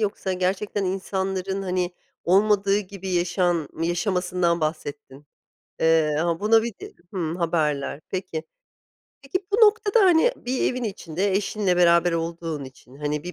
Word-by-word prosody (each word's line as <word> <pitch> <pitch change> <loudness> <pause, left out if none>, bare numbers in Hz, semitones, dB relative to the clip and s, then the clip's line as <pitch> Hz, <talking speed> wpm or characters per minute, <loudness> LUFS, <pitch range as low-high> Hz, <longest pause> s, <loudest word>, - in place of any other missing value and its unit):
yoksa 200 -2 -1
gerçekten 190 +2 -1
insanların 190 0 -2
hani 180 -1 -1 0.3
olmadığı 200 +2 +3
gibi 195 -1 -7
yaşan 175 -3 +1
yaşamasından 180 -1 0
bahsettin? 145 -2 -5 0.5
Eee, 160 -2 +3
ama 170 -1 0
buna 220 +2 +4
bir 235 -2 -4
de, - - -9 0.2
hımm, 170 -4 -2
haberler. 155 -5 -1
Peki, 185 -4 -4 0.8
peki, 370 +8 -3
bu 410 - +4
noktada 430 +1 +3
hani 360 +5 +5
bir 255 +1 -1
evin 250 -1 -4
içinde 195 -2 -2
eşinle 195 -1 0
beraber 170 0 +4
olduğun 165 -2 -3
için, 130 0 -14
hani 150 0 -2
bir 180 - -5
180 Hz, 135 wpm, -24 LUFS, 165-200 Hz, 0.8 s, hani